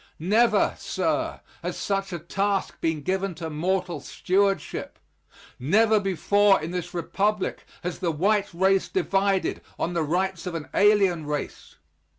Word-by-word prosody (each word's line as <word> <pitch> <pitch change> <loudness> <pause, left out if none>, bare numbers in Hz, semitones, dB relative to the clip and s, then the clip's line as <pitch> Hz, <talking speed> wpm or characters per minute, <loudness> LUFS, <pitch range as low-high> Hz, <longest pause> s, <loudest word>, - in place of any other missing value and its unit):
Never, 215 +8 +3
sir, - - -1 0.2
has - - -4
such 195 -1 -2
a 175 - -3
task 195 +4 -2
been 160 -3 -1
given 190 +1 -1
to 160 -1 -5
mortal 175 +1 -1
stewardship. 195 +5 -1 0.6
Never 215 - +4
before 195 +1 +3
in 160 +2 -5
this 180 -1 -5
Republic 200 +4 -1 0.2
has 180 0 -4
the 175 - 0
white 200 +6 +1
race 190 +2 +2
divided 195 - 0 0.2
on 175 - -2
the 170 - 0
rights 180 +3 -1
of 175 - -4
an 160 -2 -5
alien 195 -6 +3
race. 150 -1 -5
190 Hz, 140 wpm, -25 LUFS, 170-200 Hz, 0.6 s, Never